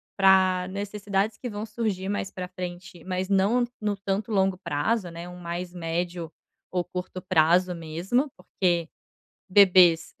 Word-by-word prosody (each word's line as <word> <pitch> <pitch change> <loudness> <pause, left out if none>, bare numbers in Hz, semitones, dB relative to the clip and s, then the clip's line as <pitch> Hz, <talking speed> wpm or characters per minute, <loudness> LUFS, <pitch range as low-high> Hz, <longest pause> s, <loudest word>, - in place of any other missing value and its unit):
pra 185 -2 +4
necessidades 205 +1 -2
que 245 - -5
vão 210 +1 -5
surgir 210 -4 -3
mais 205 -1 -2
pra 180 -1 -6
frente, 180 -1 -8
mas 185 0 -2
não 205 +6 +3 0.2
no 205 -1 -1
tanto 200 +3 -2
longo 190 -2 +2
prazo, 180 +5 -1
né, 170 +1 -8
um 180 0 -10
mais 175 +1 -5
médio 170 0 -3 0.4
ou 180 -1 0
curto 180 0 -6
prazo 180 +1 +3
mesmo, 175 - -1
porque 175 -3 0 0.6
bebês, 185 -4 +6
185 Hz, 140 wpm, -26 LUFS, 175-200 Hz, 0.6 s, bebês